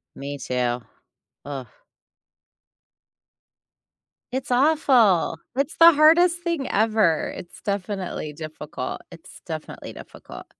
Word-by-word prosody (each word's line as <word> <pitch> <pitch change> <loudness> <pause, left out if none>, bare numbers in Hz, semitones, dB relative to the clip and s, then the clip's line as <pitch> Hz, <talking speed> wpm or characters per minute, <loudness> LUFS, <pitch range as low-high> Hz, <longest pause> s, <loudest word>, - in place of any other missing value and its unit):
Me, 140 +1 -6
too. 125 -2 -2 0.7
Ugh. 135 -3 -6 2.7
It's 260 0 -3
awful, 245 - +3 0.2
it's 280 +2 -1
the 335 0 +9
hardest 335 +3 +5
thing 335 -6 -2
ever, 215 -6 +2
it's 175 - -11
definitely 195 -6 -3
difficult. 155 0 -7
It's - - -14
definitely - - -7
difficult. - - -12
205 Hz, 90 wpm, -23 LUFS, -, 2.7 s, the